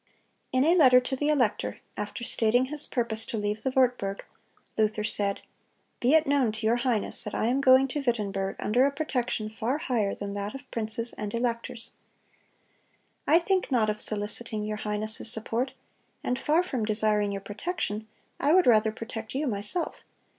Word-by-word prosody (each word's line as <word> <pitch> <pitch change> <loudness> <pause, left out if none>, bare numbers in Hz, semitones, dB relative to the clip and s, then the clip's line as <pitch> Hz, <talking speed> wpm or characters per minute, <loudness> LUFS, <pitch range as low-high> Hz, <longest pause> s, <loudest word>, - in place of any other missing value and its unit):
In 255 0 +3
a 330 - +5
letter 260 -8 +7
to 255 +1 -3
the 290 +3 0
elector, 220 - 0 0.2
after 210 +3 -5
stating 240 +2 +3
his 295 +2 0
purpose 230 -3 -1
to 225 - -3
leave 210 +1 -2
the 265 - 0
Wartburg, 245 -7 +1 0.5
Luther 215 -1 +1
said: 205 -2 +1 0.6
"Be 255 +6 +4
it 320 0 +4
known 275 -6 +2
to 220 0 -4
your 230 +2 +3
highness 240 -4 0
that 210 - -5
I - - 0
am 255 +4 +1
going 260 0 +6
to 295 +3 -2
Wittenberg 200 -6 -1
under 245 +6 +2
a - - -1
protection 250 -7 -2
far 230 +5 -1
higher 240 -11 -1
than 200 -1 -5
that 205 +2 -4
of 270 -1 -11
princes 230 +1 -2
and 210 -1 -3
electors. 235 -1 -3 1.4
I 315 - +6
think 365 -1 0
not 220 -4 +3
of 210 - -1
soliciting 210 +1 -1
your 215 0 -3
highness' 215 +1 -2
support, 230 +4 -1 0.5
and 250 - -1
far 320 +4 +2
from 255 -10 -3
desiring 210 -1 +1
your 200 0 -4
protection, 215 - -4 0.3
I 295 +4 +3
would 370 - +5
rather 220 -2 +4
protect 225 +1 -7
you 290 +3 0
myself. 215 - -2
230 Hz, 175 wpm, -27 LUFS, 210-265 Hz, 1.4 s, letter